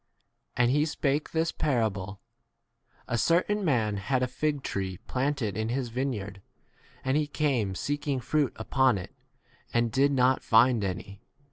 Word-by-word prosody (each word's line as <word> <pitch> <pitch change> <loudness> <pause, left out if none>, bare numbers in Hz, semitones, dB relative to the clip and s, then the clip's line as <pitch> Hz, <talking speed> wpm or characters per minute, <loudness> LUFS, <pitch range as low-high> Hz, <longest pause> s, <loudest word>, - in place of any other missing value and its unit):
And 120 0 +4
he 150 +2 +3
spake 150 -1 -1
this 165 0 0
parable: 105 -8 -1 0.9
A 120 - 0
certain 190 - +2
[man] 115 - +1
had 125 +6 0
a - - +1
fig 145 +2 -2
tree 95 -2 -3
planted 130 -6 -1
in 110 +1 -2
his 125 0 -2
vineyard, 110 -6 -3 0.6
and 130 +1 +1
he 150 0 +1
came 130 -10 0
seeking 145 - -2
fruit 145 +3 0
upon 130 0 +2
it 90 - -8 0.6
and 120 -1 +1
did 140 +4 +3
not 130 -1 +3
find 115 0 +4
[any] 100 +1 -5
125 Hz, 145 wpm, -28 LUFS, 110-145 Hz, 0.9 s, And